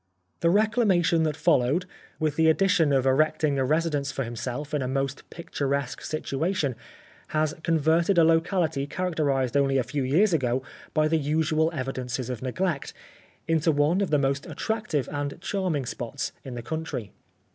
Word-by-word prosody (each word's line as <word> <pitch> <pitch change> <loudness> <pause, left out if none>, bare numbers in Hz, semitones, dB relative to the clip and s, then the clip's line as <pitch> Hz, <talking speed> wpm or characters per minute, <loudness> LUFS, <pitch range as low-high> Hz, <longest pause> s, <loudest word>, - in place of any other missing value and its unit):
The 170 - +3
reclamation 205 -5 +3
that 155 -1 -1
followed, 150 +1 +2 0.3
with 155 -3 0
the 160 0 +4
ad 160 - +3
dition 175 -6 +3
of 130 - 0
erecting 145 +1 +2
a - - +2
residence 150 0 0
for 135 - -2
himself 125 +5 -5
in 150 - +1
a 130 - -1
most 135 +1 -3
picturesque 140 -5 -3
situation, 155 -1 -1 0.5
has 155 -1 0
converted 165 +3 +2
a 170 - +7
locality 165 -3 +2
characterised 145 -7 -1
only 135 -1 +3
a 130 - +2
few 140 +4 -3
years 165 +10 +3
ago 130 -4 +1 0.3
by 155 0 +3
the 160 +1 +2
usual 155 +2 +1
evidences 130 -3 -3
of 125 - -5
neglect, 140 +4 -2 0.5
into 165 0 +2
one 150 +6 +2
of 195 - 0
the 150 - +3
most 140 0 0
attractive 215 - -2
and 145 +1 -3
charming 180 -8 -1
spots 120 +2 -4
in 130 -2 -7
the 120 - -6
country. 140 - -4
150 Hz, 160 wpm, -26 LUFS, 135-165 Hz, 0.5 s, a